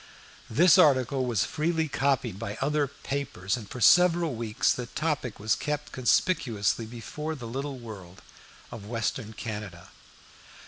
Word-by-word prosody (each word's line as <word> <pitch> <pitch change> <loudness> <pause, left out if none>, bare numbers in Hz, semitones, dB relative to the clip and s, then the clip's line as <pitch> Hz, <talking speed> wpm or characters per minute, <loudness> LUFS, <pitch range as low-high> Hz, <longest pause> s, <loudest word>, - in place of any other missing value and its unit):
This 165 +9 +6
article 130 -2 +4
was 115 -6 +1
freely 160 +1 -1
copied 135 -7 0
by 105 +2 -5
other 145 +2 +1
papers, 135 -9 -3
and 110 -5 -8
for 125 - -7
several 175 +2 +5
weeks 115 -2 0
the 125 -1 -3
topic 145 -4 -2
was 110 +2 +1
kept 150 0 -3
conspicuously 115 - +1
before 150 +7 -6
the 125 -5 -8
little 135 +4 -4
world 95 -7 -11 0.5
of 110 -4 -9
western 115 0 -3
Canada. 105 -5 -7
125 Hz, 135 wpm, -27 LUFS, 110-145 Hz, 0.5 s, This